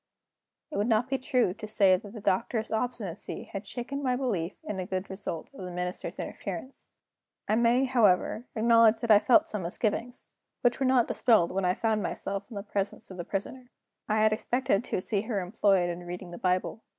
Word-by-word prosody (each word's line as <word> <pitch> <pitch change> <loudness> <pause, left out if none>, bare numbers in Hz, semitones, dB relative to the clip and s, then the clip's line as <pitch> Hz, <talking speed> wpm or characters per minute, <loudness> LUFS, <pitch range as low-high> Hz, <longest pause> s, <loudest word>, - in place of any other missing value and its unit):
It - - -4
would 205 +2 +1
not 230 +2 +2
be 270 0 0
true 250 -7 +1
to 215 - -8
say 200 -3 +5
that 200 +2 -7
the 220 - -7
Doctor's 220 +4 0
obstinacy 220 -5 -3
had 200 0 -7
shaken 260 +6 -5
my 255 -2 +1
belief 200 -10 -2
in 210 - -4
the 185 - -3
good 190 +1 -3
result 190 -4 -5
of 270 - -9
the 180 - -5
Minister's 180 0 -4
interference. 265 - -7 0.6
I 215 - +2
may, 235 +3 +3
however, 230 -2 +2
acknowledge 230 0 +5
that 235 -2 +1
I 205 - +9
felt 280 +9 +4
some 210 -11 -3
misgivings, 220 +7 -3 0.3
which 245 +1 +2
were 265 - +2
not 255 -2 +4
dispelled 220 -8 +3
when 190 0 -1
I 180 0 +2
found 220 -2 0
myself 195 +2 -4
in 230 - -9
the 200 - -4
presence 205 0 -3
of 185 - -9
the 175 - -4
Prisoner. 245 +6 -5 0.4
I 215 0 +3
had 215 0 +4
expected 240 -1 0
to 185 - -2
see 205 -3 0
her 220 -2 -2
employed 185 -1 +2
in 170 - -6
reading 175 0 -7
the 175 - -8
Bible. 185 +4 0
215 Hz, 200 wpm, -28 LUFS, 190-240 Hz, 0.6 s, I